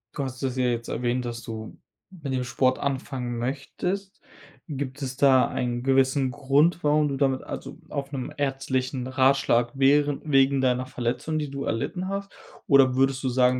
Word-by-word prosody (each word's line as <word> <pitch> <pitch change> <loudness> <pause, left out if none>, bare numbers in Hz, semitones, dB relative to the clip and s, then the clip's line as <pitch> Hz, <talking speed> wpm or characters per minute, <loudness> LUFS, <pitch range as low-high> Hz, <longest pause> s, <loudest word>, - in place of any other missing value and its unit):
Du 140 - -2
hast 130 -1 -6
es 130 -1 -1
ja 130 -1 +1
jetzt 120 -1 -1
erwähnt, 125 +1 -1
dass 120 0 -5
du 110 -1 -7 0.3
mit 155 -8 -6
dem 130 -1 -1
Sport 130 +1 +1
anfangen 130 -3 -3
möchtest. 180 +10 -4 0.5
Gibt 140 -1 -5
es 130 -1 -4
da 135 -2 +5
einen 120 -1 -2
gewissen 135 0 +2
Grund, 145 +6 +2
warum 150 0 +3
du 135 - -2
damit 135 -1 +1
also, - - -7
auf 140 0 -4
'nen 130 -2 -4
ärztlichen 135 -2 -1
Ratschlag 130 -2 +2
währe 145 +1 +3
wegen 135 -2 +3
deiner 130 -1 +1
Verletzung, 125 +6 -2
die 150 -2 -2
du 140 0 -4
erlitten 180 +11 -2
hast? 200 +1 -4 0.4
Oder 135 -3 +5
würdest 135 0 +2
du - - +2
sagen, 125 0 +3
135 Hz, 170 wpm, -25 LUFS, 125-140 Hz, 0.5 s, da